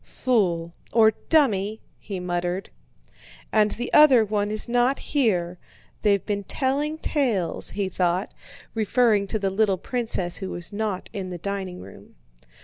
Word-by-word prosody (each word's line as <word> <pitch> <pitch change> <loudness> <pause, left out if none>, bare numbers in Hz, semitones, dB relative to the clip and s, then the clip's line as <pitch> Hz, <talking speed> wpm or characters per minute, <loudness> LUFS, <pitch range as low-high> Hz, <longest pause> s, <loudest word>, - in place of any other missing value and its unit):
"Fool... 175 -9 0 0.2
or 220 -1 +5 0.2
dummy!" 220 -9 +2 0.2
he 195 -3 -6
muttered. 180 +1 -3 0.8
"And 215 -1 +4
the 240 +3 -5
other 265 -7 +7
one 205 0 -1
is 215 +2 0
not 245 +3 +2
here. 180 - 0 0.4
They've 200 -2 +2
been 205 -1 -2
telling 285 +8 -1
tales," 240 - 0
he 200 -1 -2
thought—referring 200 +4 -1
to 220 - -1
the 195 -2 -1
little 200 -1 +2
princess 220 -5 0
who 190 - -4
was 175 +2 -6
not 205 -3 -3
in 195 -4 -5
the 180 - -5
dining 190 0 -5
room. - - -14
205 Hz, 140 wpm, -24 LUFS, 185-235 Hz, 0.8 s, other